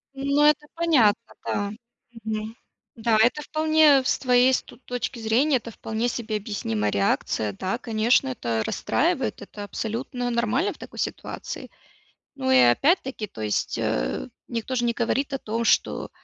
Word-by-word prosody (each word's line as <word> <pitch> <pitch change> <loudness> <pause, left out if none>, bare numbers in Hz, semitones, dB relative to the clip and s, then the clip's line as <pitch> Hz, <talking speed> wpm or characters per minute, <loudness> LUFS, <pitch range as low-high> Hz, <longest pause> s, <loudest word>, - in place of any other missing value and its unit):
Ну, 280 +2 +1
это 300 0 +3
понятно, 245 -10 +2
да. 205 0 -1 0.5
Мгм. 220 0 -4 0.4
Да, 225 -1 +2
это 245 +7 +3
вполне 310 -2 +4
с - - +1
твоей 250 0 +4
ст - - -2
точки 245 +1 -4
зрения, 245 +6 +2
это 230 -1 -8
вполне 220 +2 -3
себе 230 -2 -3
объяснимая 110 - -2
реакция. 100 +1 0
Да, 190 - -3
конечно, 235 +2 +2
это 120 - -2
расстраивает, - - 0
это 205 - -8
абсолютно 245 +4 -3
нормально 245 - +1
в - - -19
такой - - -10
ситуации. - - -5 0.7
Ну 265 -1 -2
и 260 - +6
опять-таки, 260 - +3
то 110 - -10
есть, 105 -1 -1
э, - - -1 0.2
никто 235 +2 -3
ж 245 - +1
не 235 0 +1
говорит 260 +4 -1
о 270 - 0
том, 230 0 -3
что, - - +1
235 Hz, 150 wpm, -25 LUFS, 215-270 Hz, 0.7 s, и